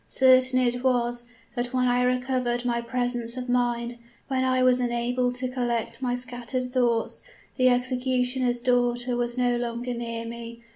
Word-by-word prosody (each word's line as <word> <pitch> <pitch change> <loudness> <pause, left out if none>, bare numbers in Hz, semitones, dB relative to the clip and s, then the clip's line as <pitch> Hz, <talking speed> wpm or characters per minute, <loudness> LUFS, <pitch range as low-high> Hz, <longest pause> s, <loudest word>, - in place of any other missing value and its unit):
Certain 255 0 +4
it 245 0 +1
was, 240 -2 +1 0.3
that 245 +1 -2
when 250 0 +2
I 245 0 +2
recovered 250 -1 0
my 235 -1 0
presence 245 0 -2
of 250 0 -4
mind, 240 -1 0 0.3
when 260 -1 +1
I 255 0 +2
was 255 0 +4
enabled 245 +1 0
to 255 +1 -3
collect 240 -2 -2
my 245 -1 0
scattered 250 0 -4
thoughts, 240 -3 +1 0.3
the 255 -1 +4
executioner's 250 0 0
daughter 245 0 +1
was 240 0 -2
no 245 -1 +2
longer 240 +1 -3
near 230 -1 -4
me. 235 0 -8
245 Hz, 155 wpm, -26 LUFS, 240-255 Hz, 0.3 s, Certain